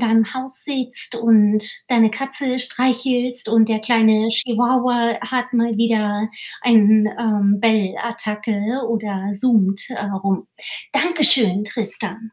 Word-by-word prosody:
deinem 225 -2 +1
Haus 260 0 +5
sitzt 255 -4 -1
und 215 -2 +3 0.2
deine 230 -3 +3
Katze 270 +1 -4
streichelst 250 -1 -1
und 225 0 +3
der 220 -1 -1
kleine 220 -1 +2
Chihuahua 240 0 0
hat 255 0 -4
mal 235 -2 0
wieder 215 -2 -1 0.3
ein, 215 -3 +4
ähm, 205 -3 0
Bellattacke 220 +1 -2
oder, 205 -4 -4
äh, - - -4
zoomt 200 -3 +1 0.4
rum. 195 -1 -2 0.5
Dankeschön, 265 - +3
Tristan. 220 0 -4
225 Hz, 110 wpm, -18 LUFS, 215-250 Hz, 0.5 s, Haus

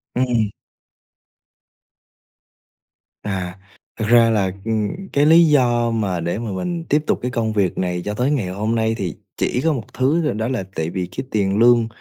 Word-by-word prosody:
Ừm. 120 -4 +1 2.7
À, 95 -2 -4 0.4
thực 110 - -1
ra 115 0 +6
là, 100 -4 +1
ừm, 115 - -2
cái 145 +1 +3
lý 165 +2 +7
do 120 -6 +3
mà 100 -6 -1
để 85 +5 -2
mà 115 -2 -4
mình 170 - -3
tiếp 150 +1 +2
tục - - +1
cái 125 - -2
công 110 -2 -1
việc 100 -4 0
này 90 -1 -1
cho 105 - -2
tới 125 +6 0
ngày 125 -10 0
hôm 105 +5 -2
nay 110 0 +1
thì 90 -7 -3 0.2
chỉ 125 - 0
có 160 - +3
một 120 -7 -7
thứ 140 +6 +2
thôi, - - 0
đó 110 +2 -2
là 125 -5 -2
tại 80 0 -2
vì 90 +1 -3
cái 130 - -3
tiền 100 -2 +1
lương 120 0 +5
115 Hz, 185 wpm, -20 LUFS, 100-125 Hz, 2.7 s, lý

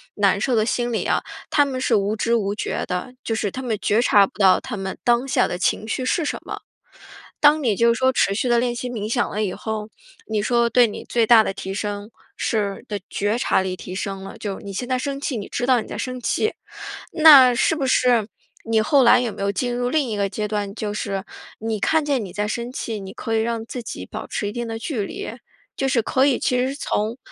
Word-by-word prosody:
难 200 -1 +2
受 250 +3 +1
的 215 -1 +2
心 240 0 -1
理 - - 0
啊， - - +1 0.3
他 290 - +4
们 265 -2 -3
是 255 - +1
无 205 +1 +1
知 230 +2 +1
无 205 -3 -1
觉 - - -3
的， 180 +8 -4
就 225 - -1
是 215 -2 -1
他 260 - -5
们 235 -4 -2
觉 215 +3 +2
察 205 -4 +5
不 - - -20
到 190 -2 +6
他 250 -5 -6
们 190 -1 -5
当 240 +2 +2
下 265 - +2
的 175 - -4
情 200 +3 0
绪 255 +3 -2
是 325 +6 +1
什 - - -2
么。 - - -6 0.8
当 300 +1 +6
你 230 -6 +2
就 235 +2 +4
是 230 - -3
说 260 0 +3
持 200 -5 +2
续 245 - 0
地 240 -1 +3
练 245 0 0
习 250 +1 -4
冥 215 -3 -4
想 240 - +1
了 210 - -2
以 190 - -2
后， 220 -1 -4 0.4
你 220 -1 0
说 235 +1 +2
对 245 +1 +5
你 210 - -7
最 235 -2 +2
大 225 -1 +7
的 - - -2
提 190 0 -5
升 205 0 -4 0.3
是 205 -3 -2
的 205 -1 -3
觉 205 +2 0
察 190 - +2
力 185 -1 -3
提 185 - -8
升 195 0 -4
了， 195 - -9
就 200 -3 -4
是 - - -14
你 200 - -6
现 245 +6 -4
在 255 - +1
生 275 +1 -3
气， 280 -2 -2
你 205 - -5
知 245 - -2
道 255 -2 +4
你 - - -9
在 - - -6
生 255 -1 -4
气。 435 - 0 0.6
那 285 -6 +8
是 320 - +2
不 275 -4 -1
是 245 -4 +3 0.4
你 225 -1 +2
后 270 +5 +4
来 245 +1 +6
有 245 - -1
没 - - -8
有 200 - +1
进 245 +4 -2
入 245 0 -1
另 295 -1 +1
一 215 - -2
个 200 -1 0
阶 210 +2 -3
段， 205 -1 -3
就 210 -3 -3
是 195 -2 -3 0.4
你 220 -1 -2
看 320 -2 +2
见 275 -5 0
你 185 - -9
在 210 0 -1
生 235 +3 -3
气， 225 -4 -4
你 190 0 -8
可 225 - -3
以 220 - +2
让 230 0 -2
自 245 +1 -6
己 220 - -7
保 - - -7
持 205 - -3
一 - - -3
定 240 0 -3
的 225 0 -5
距 240 -2 -3
离？ 405 - -6 0.5
就 270 - -1
是 255 -3 +2
可 260 +4 +2
以 275 -3 +2
其 250 - +1
实 255 +1 +1
是 275 - -5
从 220 -4 -2
230 Hz, 275 characters per minute, -22 LUFS, 205-255 Hz, 0.8 s, 那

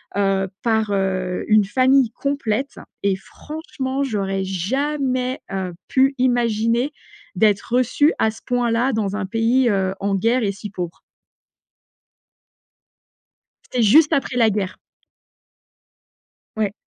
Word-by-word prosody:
heu, 195 -1 +1
par, 220 -3 +1
heu, 185 -2 -1
une 215 -2 +5
famille 260 +2 +3
complète 275 -1 -2 0.2
et 200 -1 +1
franchement 275 - -5
j'aurais 195 -6 -1
jamais, 255 - -1
heu, 190 -2 -3
pu 270 +1 +3
imaginer 240 +1 +1 0.4
d'être 210 +3 +1
reçue 255 +5 +3
à 220 - +3
ce 225 +1 -10
point-là, 245 +1 +1
dans 205 -3 -1
un 210 -2 -2
pays, 230 +5 +2
heu, 190 -1 0
en 200 0 -1
guerre 230 +6 +1
et 200 - +1
si 200 +1 -8
pauvre. 180 -3 -6 2.7
C'était 245 - +1
juste 290 +9 +6
après 270 -2 0
la 230 -2 +4
guerre! 195 -2 -2 1.8
Ouais. 210 -2 0
225 Hz, 115 wpm, -21 LUFS, 195-255 Hz, 2.7 s, juste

